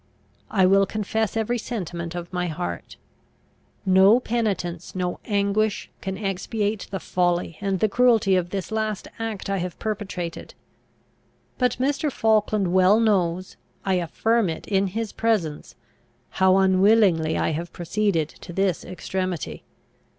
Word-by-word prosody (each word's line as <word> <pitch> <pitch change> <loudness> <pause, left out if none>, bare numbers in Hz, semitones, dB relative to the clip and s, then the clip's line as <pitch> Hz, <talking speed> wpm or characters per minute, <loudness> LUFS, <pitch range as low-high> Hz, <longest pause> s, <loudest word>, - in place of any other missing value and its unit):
I 190 -3 +3
will 195 +1 +4
confess 220 +1 -1
every 235 +2 0
sentiment 175 -7 -5
of 175 +1 -6
my 180 0 -1
heart. 175 +2 -5 0.9
"No 190 +5 +6
penitence, 200 -9 -2
no 180 -1 -2
anguish, 205 0 0
can 190 0 -4
expiate 205 +1 -2
the 195 - -4
folly 175 -3 -1
and 195 -2 -1
the 215 - +3
cruelty 225 -3 +3
of 175 -1 0
this 195 +2 -4
last 215 -2 -2
act 225 -3 -4
I 195 0 0
have 180 -1 -4
perpetrated. 190 -6 -5 1.0
But 250 -2 +3
Mr. 285 +3 0
Falkland 215 -5 +1
well 185 +3 +5
knows 185 -5 +1 0.3
I 190 - +2
affirm 195 +4 +1
it 160 - -6
in 195 -1 +2
his 220 +3 -3
presence 195 -10 -1 0.6
how 190 0 +4
unwillingly 190 -4 +4
I - - +1
have 170 +3 -4
proceeded 175 -2 0
to - - -12
this 190 0 0
extremity. 185 -1 -4
195 Hz, 135 wpm, -24 LUFS, 180-215 Hz, 1.0 s, No